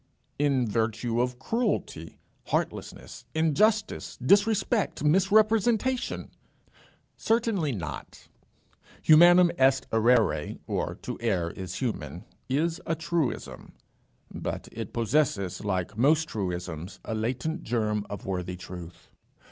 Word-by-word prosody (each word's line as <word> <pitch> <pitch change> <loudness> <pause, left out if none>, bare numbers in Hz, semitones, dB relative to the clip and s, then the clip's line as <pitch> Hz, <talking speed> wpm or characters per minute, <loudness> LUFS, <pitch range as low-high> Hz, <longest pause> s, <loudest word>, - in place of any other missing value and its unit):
"In 135 -4 +2
virtue 115 +2 0
of 125 0 -1
cruelty, 200 - -2 0.3
heartlessness, - - -3
injustice, 185 +8 +1
disrespect, 205 - +2
misrepresentation?" 215 +8 +2 0.9
"Certainly 220 - +1
not. 85 -8 -7 0.8
Humanum 175 +2 +7
est 135 0 +3
errare 110 -9 +2 1.9
is 160 +5 0
a 165 - +1
truism; 165 -3 -3 0.6
but - - -5
it - - -6
possesses, 110 - 0
like 95 0 -2
most 155 +7 +3
truisms, 90 - -5
a 110 - -3
latent 125 +10 -2
germ 105 -3 -1
of 100 -2 -7
worthy 90 -1 -3
truth. 90 -1 -10
130 Hz, 85 wpm, -27 LUFS, 105-175 Hz, 1.9 s, Humanum